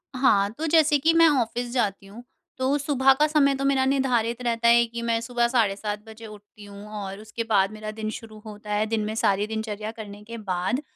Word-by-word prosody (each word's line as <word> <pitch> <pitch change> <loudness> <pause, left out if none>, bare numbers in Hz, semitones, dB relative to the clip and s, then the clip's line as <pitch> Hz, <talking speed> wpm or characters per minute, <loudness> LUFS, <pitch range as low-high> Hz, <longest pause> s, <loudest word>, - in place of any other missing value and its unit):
हाँ, 205 -6 +3
तो 315 - -3
जैसे 310 -2 +4
कि 325 +4 +3
मैं 330 0 +6
ऑफिस 240 +1 -4
जाती 200 -5 -1
हूँ 220 +5 -12 0.3
तो 260 +2 +1
सुबह 270 -2 +3
का 300 - +4
समय 285 -3 +3
तो 275 - -3
मेरा 270 -1 +2
निर्धारित 250 -3 0
रहता 235 -1 0
है 235 0 +6
कि 235 +1 -7
मैं 230 -1 0
सुबह 240 0 0
साढ़े 230 -5 +1
7 210 0 -5
बजे 220 +1 -11
उठती 210 0 -14
हूँ 200 +1 -11
और 195 0 -7
उसके 215 +2 -6
बाद 195 -1 +3
मेरा 215 0 -7
दिन 215 0 -5
शुरू 220 -1 -13
होता 210 -1 -7
है, 210 +1 +1
दिन 220 0 -1
में 215 - -4
सारी 205 -1 +1
दिनचर्या 220 -1 -4
करने 210 -2 -10
के 230 +2 -8
बाद 190 +5 -2
225 Hz, 220 wpm, -24 LUFS, 210-255 Hz, 0.3 s, मैं